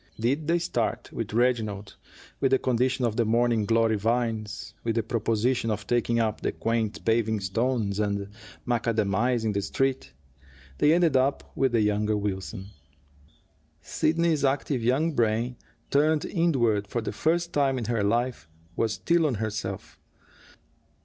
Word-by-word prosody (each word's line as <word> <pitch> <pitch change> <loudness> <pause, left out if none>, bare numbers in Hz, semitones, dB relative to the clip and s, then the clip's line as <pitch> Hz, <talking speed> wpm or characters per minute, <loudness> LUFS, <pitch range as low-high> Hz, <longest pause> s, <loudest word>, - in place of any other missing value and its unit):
Did 140 +7 0
they 170 +1 +3
start 120 -7 -2
with 115 -3 -4
Reginald, 110 -4 0 0.4
with 135 - +2
the 135 - +4
condition 130 0 0
of 115 -1 -1
the 120 - +3
morning 115 -1 +2
glory 115 -1 +3
vines, 110 -1 -2
with 115 -1 -1
the 115 - +1
proposition 115 +2 0
of 105 -1 -2
taking 120 -1 +1
up 110 -2 -1
the - - 0
quaint 115 -2 -2
paving 110 -1 +2
stones 105 +1 -1
and 100 -1 -1 0.4
macadamizing 115 -1 0
the 100 - 0
Street, 135 - -1 0.7
they 150 - +5
ended 170 -4 +3 0.4
with 135 -2 +1
the 115 - +3
younger 105 0 +1
Wilson. 100 0 -4 1.1
Sidney's 160 -2 0
active 135 -1 0
young 135 +8 +2
brain, 115 0 0 0.4
turned 150 +2 +3
inward 120 - +1
for 120 +3 -2
the 110 - -4
first 170 +2 0
time 135 -2 +2
in 120 - -3
her 115 -2 0
life, 115 -4 -1 0.3
was 110 -2 0
still 170 +3 +2
on 130 - -1
herself. 105 0 -5
115 Hz, 145 wpm, -26 LUFS, 110-130 Hz, 1.1 s, they